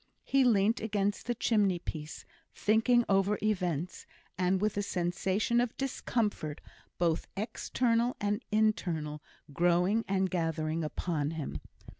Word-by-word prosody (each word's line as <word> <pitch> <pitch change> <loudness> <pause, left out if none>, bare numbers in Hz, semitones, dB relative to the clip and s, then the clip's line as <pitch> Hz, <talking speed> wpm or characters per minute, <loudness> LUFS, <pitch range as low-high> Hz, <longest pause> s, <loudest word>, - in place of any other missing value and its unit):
He 275 0 +3
leant 220 -2 +3
against 205 -1 -1
the 240 - 0
chimney 205 -5 +2
piece, 155 -2 -7 0.3
thinking 230 +3 +3
over 195 +1 +2
events, 180 -6 -1 0.3
and 185 +1 +1
with 210 +1 0
a 205 - 0
sensation 195 +5 0
of 245 -2 -2
discomfort, 220 - -2 0.4
both 165 -2 0
external 230 +2 0
and 205 +3 -1
internal, 175 -9 0 0.3
growing 175 +7 +2
and 190 -1 +1
gathering 165 -2 -1
upon 150 -1 -2
him. 150 - -4
195 Hz, 120 wpm, -31 LUFS, 170-220 Hz, 0.4 s, He